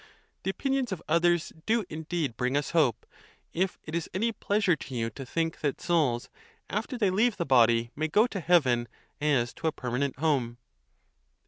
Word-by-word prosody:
The -, -, -2 dB
opinions 270 Hz, +3 st, -1 dB
of 185 Hz, -, -3 dB
others 170 Hz, +1 st, +2 dB
do 225 Hz, -2 st, +2 dB
indeed 160 Hz, -5 st, -3 dB
bring 125 Hz, +3 st, 0 dB
us 145 Hz, -, -2 dB
hope; 145 Hz, -9 st, +2 dB, 0.5 s
if 185 Hz, +2 st, 0 dB
it 155 Hz, -, -9 dB
is 170 Hz, 0 st, -2 dB
any 225 Hz, +5 st, +1 dB
pleasure 205 Hz, -4 st, +1 dB
to 135 Hz, -4 st, -8 dB
you 115 Hz, -1 st, -1 dB
to 130 Hz, +4 st, -9 dB
think 165 Hz, +3 st, -1 dB
that 145 Hz, -3 st, -1 dB
souls, 145 Hz, -9 st, +1 dB, 0.4 s
after 225 Hz, +5 st, -2 dB
they 205 Hz, -5 st, +2 dB
leave 215 Hz, +4 st, +2 dB
the 170 Hz, -, -1 dB
body, 120 Hz, -3 st, +4 dB
may 155 Hz, +2 st, -1 dB
go 210 Hz, +8 st, +4 dB
to 215 Hz, -5 st, -4 dB
heaven 140 Hz, -9 st, +3 dB, 0.3 s
as 135 Hz, -5 st, +1 dB
to 165 Hz, -, -3 dB
a -, -, +2 dB
permanent 130 Hz, 0 st, -2 dB
home. 130 Hz, -6 st, 0 dB
160 Hz, 180 wpm, -28 LUFS, 130-190 Hz, 0.5 s, body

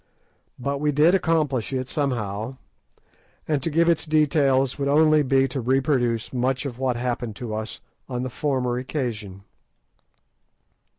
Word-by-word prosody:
But 140 Hz, +2 st, -3 dB
we 150 Hz, 0 st, +2 dB
did 150 Hz, +5 st, +4 dB
accomplish 155 Hz, -, +1 dB
it 130 Hz, -1 st, -2 dB
somehow, 120 Hz, -4 st, -2 dB, 0.9 s
and 150 Hz, -3 st, 0 dB
to 165 Hz, -, -1 dB
give 165 Hz, +2 st, +2 dB
its 170 Hz, -2 st, +2 dB
details 140 Hz, -4 st, +2 dB
would 140 Hz, -, 0 dB
only 155 Hz, +1 st, +5 dB
be 135 Hz, -1 st, +3 dB
to 130 Hz, +1 st, -3 dB
reproduce 125 Hz, -2 st, +1 dB
much 130 Hz, +2 st, 0 dB
of 125 Hz, -3 st, -5 dB
what 130 Hz, -2 st, 0 dB
happened 120 Hz, -2 st, -3 dB
to 115 Hz, 0 st, -5 dB
us 110 Hz, +1 st, -5 dB, 0.3 s
on 125 Hz, -1 st, -3 dB
the 130 Hz, -, -4 dB
former 125 Hz, -3 st, -1 dB
occasion. 110 Hz, -8 st, -4 dB
130 Hz, 140 wpm, -24 LUFS, 120-150 Hz, 0.9 s, only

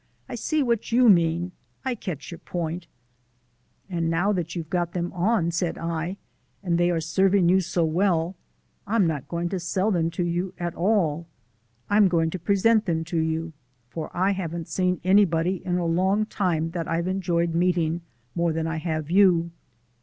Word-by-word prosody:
"I -, -, -8 dB
see 310 Hz, -2 st, 0 dB
what 235 Hz, -2 st, -1 dB
YOU 245 Hz, 0 st, +5 dB
mean. 170 Hz, -1 st, +3 dB, 0.3 s
I 260 Hz, -, 0 dB
catch 180 Hz, -, -6 dB
your 170 Hz, -, -8 dB
point." 170 Hz, 0 st, -4 dB, 1.0 s
"And 170 Hz, -3 st, -1 dB
now 175 Hz, +5 st, +1 dB
that 170 Hz, -3 st, -3 dB
you've 165 Hz, -3 st, -5 dB
got 175 Hz, -2 st, -1 dB
them 175 Hz, -1 st, -3 dB
on," 180 Hz, -1 st, +1 dB
said 170 Hz, 0 st, -1 dB
I, 165 Hz, +3 st, -3 dB, 0.5 s
"and 170 Hz, -1 st, +1 dB
they 175 Hz, 0 st, +3 dB
are 170 Hz, -2 st, +1 dB
serving 190 Hz, +3 st, +2 dB
you 190 Hz, +1 st, +4 dB
so 175 Hz, -2 st, 0 dB
well, 170 Hz, +1 st, +1 dB, 0.5 s
I'm 210 Hz, -2 st, +3 dB
not 155 Hz, -5 st, -2 dB
going 170 Hz, 0 st, -2 dB
to 190 Hz, -, -2 dB
sell 185 Hz, +4 st, 0 dB
them 165 Hz, -3 st, +1 dB
to 180 Hz, -, +1 dB
you 175 Hz, +2 st, -2 dB
at 175 Hz, -1 st, -3 dB
all. 170 Hz, -5 st, +1 dB, 0.6 s
I'm 205 Hz, 0 st, +5 dB
going 165 Hz, -2 st, +1 dB
to 185 Hz, -, -4 dB
present 205 Hz, +5 st, +3 dB
them 165 Hz, -2 st, 0 dB
to 170 Hz, 0 st, -2 dB
you 160 Hz, +1 st, -2 dB, 0.4 s
for 160 Hz, -, -5 dB
I 190 Hz, +2 st, +3 dB
haven't 170 Hz, -4 st, -4 dB
seen 180 Hz, -2 st, 0 dB
anybody 185 Hz, -2 st, +3 dB
in 180 Hz, -1 st, -1 dB
a 175 Hz, -, -1 dB
long 190 Hz, +5 st, +2 dB
time 170 Hz, -6 st, -1 dB
that 170 Hz, -2 st, -4 dB
I've 170 Hz, +1 st, -1 dB
enjoyed 170 Hz, -3 st, 0 dB
meeting 170 Hz, -1 st, +1 dB, 0.3 s
more 170 Hz, -1 st, 0 dB
than 160 Hz, 0 st, -2 dB
I 165 Hz, 0 st, -2 dB
have 155 Hz, -1 st, -3 dB
you." 175 Hz, -3 st, +4 dB
175 Hz, 180 wpm, -25 LUFS, 165-190 Hz, 1.0 s, YOU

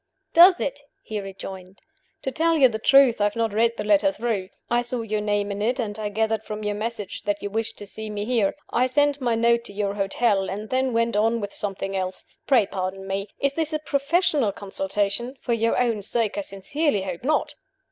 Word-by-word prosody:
"Does 355 Hz, +2 st, +8 dB
it?" 280 Hz, +1 st, -2 dB, 0.2 s
he 215 Hz, -1 st, -4 dB
rejoined. 190 Hz, -1 st, -9 dB, 0.4 s
"To 265 Hz, -, -1 dB
tell 325 Hz, +4 st, +2 dB
you 270 Hz, -3 st, +7 dB
the 220 Hz, -3 st, -4 dB
truth, 265 Hz, -2 st, +5 dB
I -, -, +4 dB
have 205 Hz, -, -1 dB
not 225 Hz, -2 st, 0 dB
read 230 Hz, +2 st, +2 dB
the -, -, -2 dB
letter 205 Hz, -1 st, +4 dB
through. 205 Hz, -3 st, -2 dB, 0.2 s
I 240 Hz, 0 st, +2 dB
saw 245 Hz, 0 st, -3 dB
your 215 Hz, -1 st, -2 dB
name 205 Hz, -1 st, 0 dB
in 200 Hz, +1 st, -4 dB
it, 245 Hz, +5 st, 0 dB
and 215 Hz, -3 st, -3 dB
I 210 Hz, -1 st, -2 dB
gathered 220 Hz, +1 st, 0 dB
from 215 Hz, 0 st, -6 dB
your 210 Hz, 0 st, -1 dB
message 215 Hz, -1 st, -4 dB
that 205 Hz, 0 st, -1 dB
you 205 Hz, -, -3 dB
wished 225 Hz, +1 st, -2 dB
to 205 Hz, -, -8 dB
see 220 Hz, +2 st, -6 dB
me 205 Hz, 0 st, -3 dB
here. 225 Hz, -4 st, +1 dB, 0.2 s
I 250 Hz, +2 st, +2 dB
sent 285 Hz, +2 st, +2 dB
my 240 Hz, -2 st, +1 dB
note 235 Hz, +1 st, +3 dB
to -, -, -6 dB
your 200 Hz, -1 st, -1 dB
hotel 195 Hz, 0 st, +1 dB
and 210 Hz, +2 st, -6 dB
then 260 Hz, 0 st, +1 dB
went 230 Hz, -1 st, +1 dB
on 225 Hz, +2 st, +2 dB
with 205 Hz, -2 st, -5 dB
something 195 Hz, -1 st, -2 dB
else. 185 Hz, -1 st, -3 dB, 0.2 s
Pray 245 Hz, -7 st, +5 dB
pardon 190 Hz, 0 st, -4 dB
me. 195 Hz, +1 st, -3 dB
Is 280 Hz, 0 st, 0 dB
this 315 Hz, +1 st, -1 dB
a -, -, +2 dB
professional 290 Hz, -, +1 dB
consultation? 200 Hz, +5 st, -2 dB
For 240 Hz, -, -1 dB
your 230 Hz, 0 st, +1 dB
own 230 Hz, -4 st, +1 dB
sake, 220 Hz, +1 st, 0 dB
I 205 Hz, -, -1 dB
sincerely 200 Hz, +5 st, -1 dB
hope 185 Hz, 0 st, -5 dB
not!" 295 Hz, +1 st, +1 dB
220 Hz, 220 wpm, -24 LUFS, 200-245 Hz, 0.4 s, Does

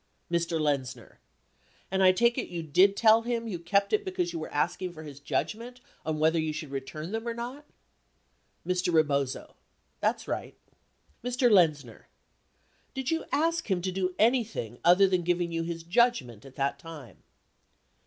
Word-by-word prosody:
Mr. 170 Hz, -1 st, 0 dB
Lenzner. 140 Hz, -4 st, -2 dB, 0.7 s
And 190 Hz, 0 st, +1 dB
I 185 Hz, -1 st, +7 dB
take 235 Hz, +6 st, +2 dB
it -, -, -3 dB
you 170 Hz, -2 st, -5 dB
did 185 Hz, +6 st, +4 dB
tell 225 Hz, 0 st, +6 dB
him 230 Hz, 0 st, -2 dB
you 185 Hz, -6 st, -4 dB
kept 200 Hz, +4 st, +1 dB
it 215 Hz, -, +2 dB
because 180 Hz, -2 st, -2 dB
you 165 Hz, -, -3 dB
were 155 Hz, -, -6 dB
asking 175 Hz, +4 st, -1 dB
for 155 Hz, -2 st, -10 dB
his 145 Hz, -2 st, -10 dB
judgment 230 Hz, +11 st, -3 dB, 0.2 s
on 155 Hz, -1 st, -2 dB
whether 160 Hz, +2 st, +2 dB
you 155 Hz, -1 st, -1 dB
should 155 Hz, -2 st, -6 dB
return 155 Hz, +5 st, -6 dB
them 225 Hz, +2 st, -4 dB
or 230 Hz, -, -2 dB
not? 255 Hz, +5 st, -7 dB, 1.0 s
Mr. 180 Hz, 0 st, 0 dB
Rebozo. 140 Hz, -5 st, 0 dB, 0.5 s
That's -, -, -1 dB
right. -, -, -4 dB, 0.7 s
Mr. 245 Hz, 0 st, +2 dB
Lexzner. 150 Hz, -, +2 dB, 0.9 s
Did 265 Hz, +1 st, -2 dB
you 325 Hz, -, -1 dB
ask 330 Hz, -2 st, 0 dB
him 180 Hz, -3 st, 0 dB
to 185 Hz, -, -1 dB
do 185 Hz, -1 st, -2 dB
anything 225 Hz, -, +1 dB
other 180 Hz, +3 st, +6 dB
than 185 Hz, -1 st, +1 dB
giving 175 Hz, 0 st, 0 dB
you 165 Hz, 0 st, -1 dB
his 165 Hz, 0 st, -5 dB
judgment 175 Hz, -, +1 dB
at 135 Hz, -1 st, -13 dB
that 140 Hz, 0 st, -1 dB
time 150 Hz, -, -11 dB
175 Hz, 165 wpm, -28 LUFS, 155-220 Hz, 1.0 s, I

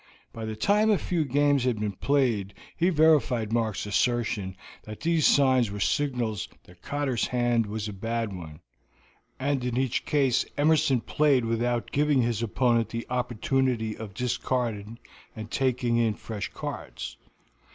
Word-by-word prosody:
By 115 Hz, -1 st, -6 dB
the 110 Hz, 0 st, -4 dB
time 210 Hz, -, +3 dB
a 210 Hz, -, +4 dB
few 175 Hz, -3 st, -1 dB
games 145 Hz, 0 st, +2 dB
had 125 Hz, -4 st, 0 dB
been 105 Hz, -1 st, -1 dB
played 115 Hz, -3 st, 0 dB, 0.2 s
he 175 Hz, +2 st, +2 dB
verified 145 Hz, -, +3 dB
Mark's 110 Hz, -4 st, 0 dB
assertion 105 Hz, -3 st, 0 dB, 0.2 s
that 110 Hz, 0 st, -10 dB
these 165 Hz, -2 st, +3 dB
signs 130 Hz, -5 st, +4 dB
were 105 Hz, +1 st, -6 dB
signals 120 Hz, -4 st, -1 dB
that 90 Hz, 0 st, -19 dB
Cotter's 140 Hz, -5 st, -1 dB
hand 120 Hz, -2 st, +1 dB
was 105 Hz, +1 st, -4 dB
a 105 Hz, -, -5 dB
bad 115 Hz, +1 st, -3 dB
one, 80 Hz, -5 st, -9 dB, 0.8 s
and 135 Hz, -1 st, 0 dB
in 125 Hz, -1 st, -2 dB
each 130 Hz, -2 st, 0 dB
case 135 Hz, -4 st, +2 dB
Emerson 145 Hz, -4 st, +3 dB
played 140 Hz, -4 st, +2 dB
without 120 Hz, +1 st, -1 dB
giving 145 Hz, -3 st, +2 dB
his 115 Hz, -2 st, -1 dB
opponent 115 Hz, 0 st, +1 dB
the 115 Hz, +1 st, -4 dB
opportunity 125 Hz, -2 st, 0 dB
of 105 Hz, -3 st, -9 dB
discarding 115 Hz, -2 st, -2 dB, 0.4 s
and 110 Hz, -1 st, -8 dB
taking 125 Hz, -3 st, +1 dB
in 115 Hz, -2 st, +2 dB
fresh 105 Hz, -2 st, -5 dB
cards. -, -, -6 dB
120 Hz, 150 wpm, -27 LUFS, 110-135 Hz, 0.8 s, a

